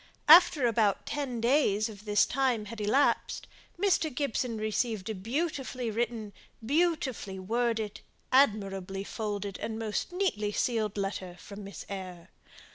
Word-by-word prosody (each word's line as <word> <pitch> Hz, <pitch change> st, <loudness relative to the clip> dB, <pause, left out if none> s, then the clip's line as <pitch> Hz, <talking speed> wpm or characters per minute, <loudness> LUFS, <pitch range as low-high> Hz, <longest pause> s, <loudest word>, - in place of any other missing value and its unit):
After 315 Hz, -4 st, +8 dB
about 210 Hz, -3 st, +2 dB
ten 270 Hz, -4 st, -3 dB
days 230 Hz, -4 st, +2 dB
of 210 Hz, -1 st, -11 dB
this 210 Hz, -1 st, +4 dB
time 250 Hz, -5 st, 0 dB
had 215 Hz, +1 st, -7 dB
elapsed, 240 Hz, +8 st, +1 dB, 0.3 s
Mr. 360 Hz, -5 st, +2 dB
Gibson 245 Hz, -3 st, -2 dB
received 215 Hz, -1 st, -1 dB
a -, -, -2 dB
beautifully 255 Hz, -, -3 dB
written, 220 Hz, -2 st, -2 dB, 0.3 s
beautifully 280 Hz, -, 0 dB
worded, 220 Hz, +1 st, -1 dB, 0.3 s
admirably 195 Hz, -7 st, +2 dB
folded, 205 Hz, -2 st, -4 dB
and 220 Hz, -1 st, -4 dB
most 225 Hz, -, -3 dB
neatly 350 Hz, -, -1 dB
sealed 215 Hz, -4 st, 0 dB
letter 195 Hz, -2 st, -3 dB
from 200 Hz, +3 st, -10 dB
Miss 200 Hz, 0 st, -8 dB
Eyre. 185 Hz, -3 st, -7 dB
220 Hz, 125 wpm, -29 LUFS, 205-255 Hz, 0.3 s, After